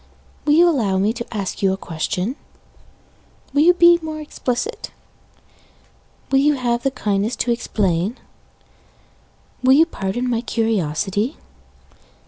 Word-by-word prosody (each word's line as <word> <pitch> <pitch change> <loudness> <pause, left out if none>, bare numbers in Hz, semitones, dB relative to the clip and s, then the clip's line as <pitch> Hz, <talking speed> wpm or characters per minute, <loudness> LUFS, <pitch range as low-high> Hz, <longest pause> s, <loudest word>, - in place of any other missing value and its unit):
Will 295 - +3
you 340 +3 +6
allow 225 - +1
me 205 +4 +1
to 235 -1 -7
ask 200 -4 -4
you 195 -1 +3
a - - -4
question? 180 - -3 1.2
Will 285 - +3
you 350 +3 +5
be 345 0 +6
more 310 -1 -5
explicit? 250 -5 -4 1.4
Will 270 - +4
you 295 +1 +3
have 240 -2 -1
the 270 - +1
kindness 210 -3 -1
to 240 - -1
explain? 205 -3 -1 1.4
Will 260 +1 +5
you 310 +4 +6
pardon 245 - -3
my 235 -2 0
curiosity? 210 - -1
235 Hz, 125 wpm, -20 LUFS, 200-280 Hz, 1.4 s, you